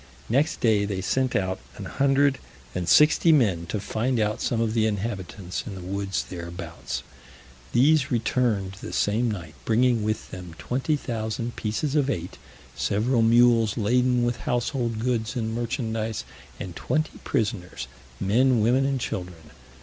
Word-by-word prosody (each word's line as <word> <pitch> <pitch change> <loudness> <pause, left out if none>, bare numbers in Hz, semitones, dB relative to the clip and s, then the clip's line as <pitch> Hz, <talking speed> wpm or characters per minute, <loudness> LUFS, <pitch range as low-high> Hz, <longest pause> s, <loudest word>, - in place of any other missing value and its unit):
Next 140 +7 +1
day 110 -5 +3
they 100 -2 -3
sent 130 +7 0
out 95 -1 0 0.2
an - - -6
hundred 140 0 +2 0.3
and 90 -2 -2
sixty 155 +2 +6
men 100 - +3
to 105 - -2
find 115 +5 -1
out 105 +1 0
some 120 - 0
of 115 -1 +1
the 110 -1 +3
inhabitants 100 -3 -4
in 100 - -6
the 95 - -7
woods 95 +1 -2
thereabouts. 85 -1 -6 0.7
These 140 +3 +4
returned 115 -5 0
the - - -7
same 115 +4 +1
night, 85 -7 -5
bringing 120 +1 +3
with 110 +1 -2
them 90 -3 -8
20,000 120 - -2
pieces 115 +7 -2
of 145 -3 +2
eight, 90 -8 -4 0.4
several 115 +4 +1
mules 115 -2 +4
laden 125 +3 +2
with 120 0 0
household 120 -1 -1
goods 120 0 -1
and 110 -2 -2
merchandise, 115 -2 -2 0.4
and 90 -2 -6
twenty 155 0 -1
prisoners, 105 -5 -2 0.3
men, 120 +5 +3
women, 130 +5 +3
and 135 -1 0
children. 90 -8 -5
115 Hz, 145 wpm, -25 LUFS, 100-125 Hz, 0.7 s, sixty